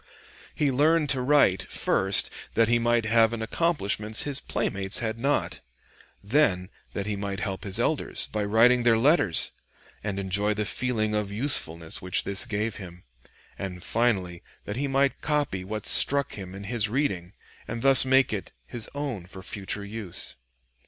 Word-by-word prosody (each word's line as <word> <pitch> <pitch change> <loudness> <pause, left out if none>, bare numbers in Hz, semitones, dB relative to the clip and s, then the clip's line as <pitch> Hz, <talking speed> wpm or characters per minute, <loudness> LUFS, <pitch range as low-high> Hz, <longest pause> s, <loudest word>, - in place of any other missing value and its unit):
He 145 -2 +1
learned 150 +3 +2
to 130 -2 +2
write, 125 -9 +2
first, 95 +1 +1 0.2
that 115 0 +4
he 120 +1 +3
might 120 -1 +1
have 115 0 +3
an 115 -1 -3
accomplishment 110 - -1
his 140 -2 +2
playmates 100 -6 -2
had 115 -1 -3
not; 140 +4 -1 0.6
then 100 -6 +1 0.2
that 100 - -3
he 105 0 -2
might 100 -1 -4
help 95 -2 -4
his 100 +2 -1
elders 150 +5 0
by 105 -1 -1
writing 115 +4 +4
their 120 -2 +4
letters, 120 - +3 0.5
and 100 -2 -3
enjoy 100 +2 0
the 105 0 -1
feeling 110 -1 -1
of 105 -1 -1
usefulness 85 - 0
which 90 -1 0
this 100 -1 0
gave 110 +1 -2
him; 90 -3 -11 0.6
and 90 -2 -6
finally 95 -7 0 0.2
that 105 - -4
he 140 +3 -1
might 135 0 +1
copy 145 -11 -1
what 105 +2 -5
struck 140 0 +5
him 95 -2 -8
in 100 - -8
his 110 0 -1
reading 105 -8 -2 0.3
and 115 - -5
thus 135 -1 +6
make 130 -2 +3
it 100 - -5
his 115 - -7
own 130 -11 -4
for 95 +1 -11
future 100 0 -4
use. 100 -4 -5
110 Hz, 165 wpm, -26 LUFS, 100-125 Hz, 0.6 s, thus